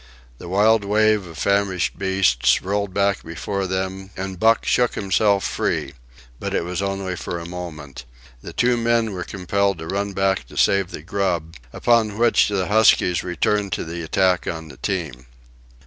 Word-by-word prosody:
The 85 - -9
wild 105 +3 +3
wave 105 -1 +2
of 80 -2 -11
famished 100 0 0
beasts 95 -11 +2
rolled 100 +1 -1
back 100 0 +1
before 95 +4 -4
them, 95 +1 -3
and 95 -1 -5
Buck 115 +2 +3
shook 125 -1 +2
himself 100 0 +2
free. - - -2 0.5
But - - -3
it - - 0
was 90 +1 -3
only 95 -1 -2
for 85 - -5
a 85 - -7
moment. 80 -7 -8 0.4
The - - -8
two 120 0 +2
men 115 -1 +1
were 90 -2 -4
compelled 100 +1 -1
to 80 - -7
run 100 +3 -2
back 95 0 0
to - - -13
save 100 -2 +3
the 75 - -8
grub, 85 -3 -2 0.2
upon 110 - +2
which 120 0 +4
the 100 -3 0
huskies 105 -4 +3
returned 100 +3 0
to - - -2
the 85 +1 -5
attack 90 +2 +1
on 80 -1 -5
the - - -12
team. 80 - -4
95 Hz, 170 wpm, -22 LUFS, 90-100 Hz, 0.5 s, which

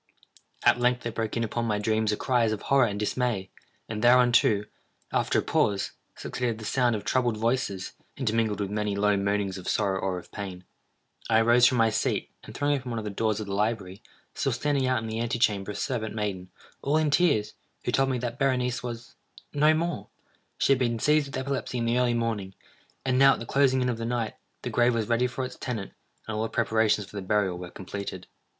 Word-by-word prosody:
At - - +5
length 125 0 +2
there 120 - -3
broke 110 0 -3
in 115 - 0
upon 115 +1 -2
my 105 -2 0
dreams 110 +1 +1
a 105 - -1
cry 125 -3 +2
as 110 - +2
of 110 - -4
horror 135 -3 +4
and 100 -1 -4
dismay; 105 -3 -1 0.4
and 110 0 -4
thereunto, 120 -4 +5 0.5
after - - +1
a - - +3
pause, 100 -2 +1 0.2
succeeded 120 -3 -3
the 110 - -8
sound 120 0 +2
of 105 - -5
troubled 120 -4 +1
voices, 105 -5 -1 0.3
intermingled 115 -4 0
with 100 -1 -2
many 105 -1 -1
low 105 0 +3
moanings 100 -1 -1
of 90 - -5
sorrow 100 -3 +1
or 95 -1 -1
of 90 - -10
pain. 95 -3 -6 0.7
I 110 -1 +5
arose 120 +2 +6
from 125 - +1
my 115 -1 +4
seat, - - -1
and - - -11
throwing 145 0 +1
open 130 -2 -5
one 115 - -3
of 110 - -3
the 105 - -4
doors 110 +1 0
of 110 - -4
the 100 - -5
library, 100 -2 -1 0.3
saw - - -1
standing 140 -3 0
out 130 -3 +1
in - - -4
the 110 0 -3
ante 120 +1 -1
chamber 105 -5 +1
a 105 - -4
servant 115 -5 -3
maiden, 100 -4 -3 0.3
all 145 +3 +1
in 155 -2 +2
tears, 145 -10 +2 0.3
who - - 0
told 135 0 +2
me 130 - 0
that 120 0 -4
Berenice 125 -2 +1
was—no 125 +5 -2
more! 170 +2 -2 0.5
She - - +2
had 135 - +4
been 120 -2 +1
seized 150 +4 +3
with 135 - -6
epilepsy 130 -1 -3
in 115 - -1
the 120 +2 +2
early 120 -1 +2
morning, 110 -5 -2 0.5
and 130 -1 +2
now, 135 0 +7
at - - -5
the 115 - -6
closing 130 0 +3
in - - 0
of 115 -2 -2
the 115 - -3
night, 115 -2 -1 0.3
the - - -3
grave 120 0 +3
was 110 -2 -1
ready 120 +2 +2
for 130 +1 -4
its - - -8
tenant, 110 -6 -4 0.4
and 110 - -3
all 110 - -1
the 110 - -1
preparations 110 -2 +1
for 105 - -15
the 100 - -3
burial 95 -2 0
were 90 -1 -7
completed. 95 0 -6
115 Hz, 220 wpm, -27 LUFS, 105-125 Hz, 0.7 s, now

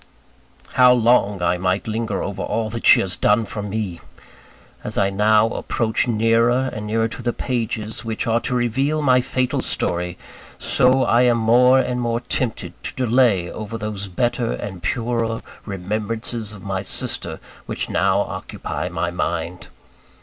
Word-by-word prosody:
How 125 -1 +6
long 115 -6 +3
I 90 +1 +2
might 95 +3 0
linger 110 -2 -2
over 100 - -4
all 110 -1 -2
that 115 0 -2
she - - +8
has 95 - 0
done 105 +2 +2
for 105 - -5
me! 100 -4 -4 0.8
As - - -4
I 100 0 +2
now 105 +2 +4
approach 115 0 0
nearer 115 +3 +2
and 105 0 -5
nearer 115 +1 +1
to 115 - -8
the 120 0 0
pages 110 -3 -3
which 110 -1 -3
are 115 0 +2
to 125 +1 -3
reveal 135 +6 0
my 125 -2 +4
fatal 125 0 -1
story, 90 0 -2 0.4
so 130 +1 +3
I 120 - +3
am 120 -1 +4
more 125 +3 +5
and 125 -1 0
more 115 -1 0
tempted 125 -3 -2
to - - -5
delay 120 -8 +2
over 110 +1 -6
those 105 -2 -4
better 120 +5 -1
and 95 -3 -6
purer 115 0 -1 0.2
remembrances 105 +3 -3
of 105 -3 -11
my 95 -2 -2
sister 95 - -4 0.3
which - - -3
now - - +2
occupy 90 - -5
my 85 0 -2
mind. 85 0 -3
110 Hz, 155 wpm, -21 LUFS, 100-120 Hz, 0.8 s, she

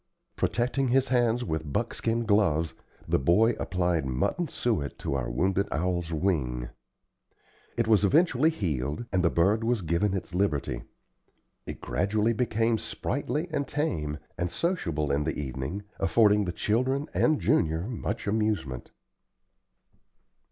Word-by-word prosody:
Protecting 125 +3 0
his 130 +2 +2
hands 120 -1 +2
with 80 -5 -3
buckskin 115 +9 -1
gloves, 95 -7 +2 0.3
the - - +2
boy 95 - +4
applied 90 -3 0
mutton 65 - -1
suet 110 - -2
to - - -3
our 65 -3 -1
wounded 95 +10 +1
owl's 85 0 -1
wing. 70 -8 -1 1.1
It 115 -1 +1
was 110 -3 +4
eventually 155 - +4
healed, 75 - -2
and 95 -2 +1
the 85 - +4
bird 100 +8 +2
was 115 -3 0
given 85 +5 +1
its 95 -1 -5
liberty. 75 -10 0 0.9
It - - -7
gradually 105 - +1
became 115 -1 +1
sprightly 150 +5 -2
and 145 -3 -1
tame, 80 - -2 0.2
and 90 0 0
sociable 85 - -1
in 70 +1 +1
the 80 0 -2
evening, 70 +7 -4 0.2
affording 105 +1 +4
the 90 - -2
children 130 - 0
and 155 -2 +3
Junior 80 +1 +2
much 120 -2 -4
amusement. 100 - -1
100 Hz, 130 wpm, -28 LUFS, 80-115 Hz, 1.1 s, boy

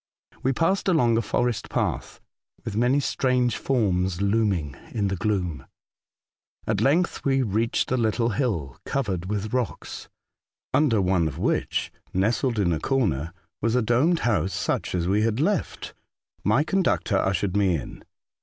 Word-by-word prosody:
We 130 - +1
passed 165 +10 +1
along 125 -11 +3
a 115 - +2
forest 120 +2 -1
path, - - -2 0.5
with 110 - -4
many 125 +5 +3
strange 125 -3 +1
forms 95 -8 0
looming 100 -8 +1
in 100 -3 -1
the 95 - -1
gloom. 90 -5 -2 1.0
At 110 -1 0
length 160 +9 +2
we 135 -1 +2
reached 115 +2 0
a 130 - +2
little 115 0 +1
hill, 100 - -2
covered 95 -10 -2
with 105 +1 -3
rocks, 125 -3 -3 0.6
under 135 -8 +3
one 90 -3 +2
of 75 - -5
which, - - -1 0.2
nestled 115 +5 +1
in 90 -5 +2
a 80 - -1
corner, 85 - 0 0.3
was 115 +2 +1
a 125 - +2
domed 135 +10 +2
house 105 -4 +1
such - - -1
as 85 -1 -1
we 100 +3 +2
had 110 +1 0
left. 175 +3 -1 0.5
Mv 110 +9 +3
con 195 +2 +1
ductor 105 - +1
ushered 95 0 0
me 95 -4 +3
in. 70 - -7
110 Hz, 155 wpm, -25 LUFS, 95-130 Hz, 1.0 s, along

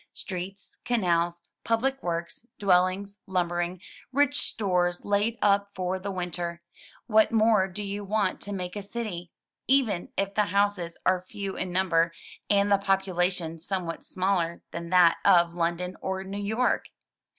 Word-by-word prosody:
Streets, 190 +1 -7
canals, 175 -7 +1 0.3
public 265 +4 0
works, 170 +6 -4
dwellings, 190 +1 +2
lumbering, 175 -1 -1 0.3
rich 285 +1 +3
stores 180 -4 0
laid 205 +3 +1
up 200 0 +3
for 185 0 -2
the 195 +2 -5
winter 175 -2 -3 0.2
— - - -20
what 220 -2 +4
more 220 -3 +4
do 195 +3 -6
you 200 +1 -4
want 205 -1 0
to 205 - -6
make 180 -2 -4
a 205 - -3
city, 200 -5 -5 0.4
even 245 -9 +2
if 195 0 0
the 210 0 +2
houses 200 -4 0
are 185 -1 +2
few 200 -2 -4
in 185 - -3
number, 170 -2 +2 0.4
and 205 0 +3
the 200 - +5
population 180 -4 0
somewhat 175 -1 -3
smaller 185 -3 -1
than 170 0 -6
that 180 -2 +6
of 175 -3 +5
London 175 +2 -1
or 190 0 -2
New 195 +1 -5
York? 220 +5 +1
190 Hz, 150 wpm, -27 LUFS, 175-205 Hz, 0.4 s, that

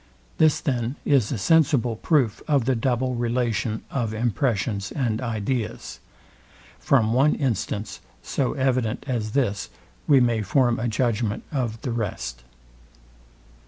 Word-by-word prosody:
This 155 -2 +4
then 125 -2 -1
is 135 -7 +3
a 130 - -1
sensible 135 -1 +3
proof 125 -3 +1
of 140 -6 +2
the 130 0 +2
double 125 +2 0
relation 120 -2 -1
of 115 -5 -2
impressions 110 -4 -1
and 120 -5 -1
ideas. 115 0 -3 0.8
From 115 -5 +2
one 135 +5 +4
instance 105 - -2 0.2
so 135 - -1
evident 130 -5 0
as 110 -5 -2
this 100 - 0 0.4
we 140 -2 +6
may 120 -3 +2
form 120 +3 +2
a 120 - -1
judgment 115 -2 -1
of 120 -6 -2
the 125 - -2
rest. 90 - -4
120 Hz, 125 wpm, -24 LUFS, 110-130 Hz, 0.8 s, we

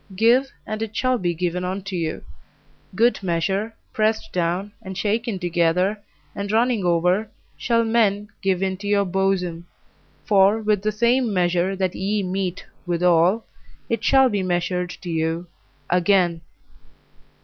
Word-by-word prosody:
Give, 245 +6 +3
and 215 0 -4
it 220 -1 -4
shall 255 -1 +1
be 175 -2 -1
given 180 +1 -2
unto 190 +1 -4
you; 165 -2 -3 0.7
good 235 +3 +3
measure, 195 +5 -1 0.2
pressed 220 0 0
down, 180 +3 -1
and 190 -3 -7
shaken 220 +1 -1
together, 180 +3 +1 0.3
and 200 0 -4
running 230 -1 +2
over, 180 +5 +2 0.3
shall 230 -1 +1
men 210 -3 +1
give 190 -1 0
into 190 +1 -3
your 200 -1 +2
bosom. 180 -2 -1 0.6
For 200 +1 +4
with 210 -2 +1
the 215 +1 0
same 235 +2 +2
measure 180 0 +1
that 185 -2 -1
ye 200 +2 -1
mete 185 -1 -3 0.2
withal 175 +4 +3 0.4
it 230 -1 -1
shall 265 +1 +5
be 205 -5 -1
measured 180 0 -1
to 180 - -7
you 160 +1 -1 0.4
again. 180 -1 +2
195 Hz, 140 wpm, -22 LUFS, 180-215 Hz, 0.7 s, shall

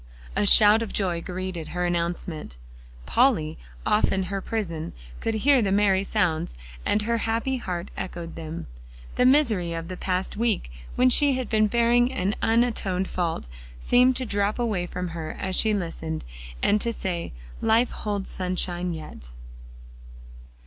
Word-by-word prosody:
A 205 - +2
shout 210 +2 +8
of 225 - -4
joy 180 -4 0
greeted 180 -2 -5
her 180 0 -2
announcement. 170 - -2 0.5
Polly, 180 - +2 0.3
off 210 0 +3
in 190 0 0
her 195 - -1
prison, 170 -9 -4 0.3
could 225 - -1
hear 265 +4 +4
the 200 -3 0
merry 195 -1 +3
sounds, 160 - -1 0.3
and 210 - +1
her 230 +1 0
happy 230 +4 -1
heart 180 -6 -4
echoed 170 -2 -6
them. 165 0 -6 0.5
The 250 - +4
misery 225 - +3
of 165 +1 -5
the 185 - -5
past 185 0 -2
week, 220 - 0 0.2
when 255 +1 +4
she 285 +2 +5
had 255 -4 -4
been 215 -1 +3
bearing 240 +2 +3
an 205 -6 -1
unatoned 220 -5 +1
fault, 170 - -2 0.3
seemed 250 - +4
to 255 - -2
drop 205 -1 0
away 215 -7 -1
from 180 0 -4
her 160 -2 -5
as 190 -1 -1
she 220 - +3
listened, 165 -5 -3 0.4
and 210 0 +3
to 235 - 0
say, 180 -6 -4 0.3
"Life 225 +2 +3
holds 205 -2 -3
sunshine 180 -1 -1
yet." 155 - -9
195 Hz, 155 wpm, -25 LUFS, 175-225 Hz, 0.5 s, shout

